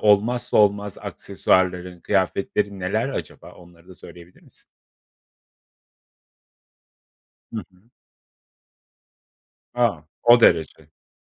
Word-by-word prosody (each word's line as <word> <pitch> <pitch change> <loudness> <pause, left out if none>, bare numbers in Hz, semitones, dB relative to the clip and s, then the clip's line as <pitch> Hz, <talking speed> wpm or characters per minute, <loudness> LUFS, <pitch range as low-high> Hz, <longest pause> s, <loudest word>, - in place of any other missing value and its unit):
olmazsa 105 +3 +2
olmaz 100 -1 +2
aksesuarların, 90 -1 -1
kıyafetlerin 100 +1 -1
neler 105 +7 -1
acaba? 135 - -7
Onları 85 0 -19
da 95 - -12
söyleyebilir 90 0 -15
misin? - - -16 2.9
Hı - - -6 0.2
hı. 95 +6 -28 1.8
A! 115 -11 0 0.2
O 120 +1 +7
derece. 85 -7 +3
Hı. - - -31
100 Hz, 85 wpm, -22 LUFS, 90-105 Hz, 2.9 s, O